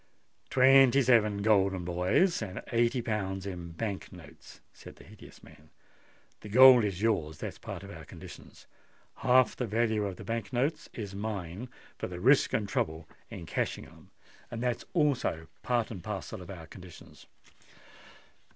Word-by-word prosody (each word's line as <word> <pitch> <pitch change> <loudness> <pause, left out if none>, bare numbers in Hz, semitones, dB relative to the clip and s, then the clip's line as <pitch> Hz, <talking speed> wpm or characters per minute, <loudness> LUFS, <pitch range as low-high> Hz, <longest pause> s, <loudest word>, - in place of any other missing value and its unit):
"Twenty 135 0 +6
seven 105 -5 +3
golden 95 -4 +2
boys, 90 - +1
and 100 -3 -6
eighty 120 +1 +1
pounds 95 -4 -3
in 90 -3 -7
Bank 100 +2 -5
notes," 85 -5 -14
said - - -13
the - - -16
hideous - - -15
man. 75 +1 -17 0.7
"The 105 - -10
gold 125 +1 +8
is 100 -1 -3
yours—that's 80 -9 -2
part - - -7
of - - -10
our - - -10
conditions: - - -13 0.5
half 130 0 +3
the 125 - -3
value 110 -1 0
of 95 - -5
the - - -10
Bank 115 -2 -4
notes 135 +5 -1
is 100 -4 -7
mine, 100 +1 -5 0.3
for - - -3
the 90 -1 -7
risk 135 +8 +4
and 105 -2 -1
trouble 80 -4 -2 0.2
in - - -8
cashing - - -3
them—that's 120 +1 -7
also 140 - 0 0.2
part 120 -2 -1
and 95 -6 -8
parcel 100 -3 -6
of 90 - -11
our 85 -4 -8
conditions. 90 +1 -14
105 Hz, 150 wpm, -29 LUFS, 90-120 Hz, 0.7 s, gold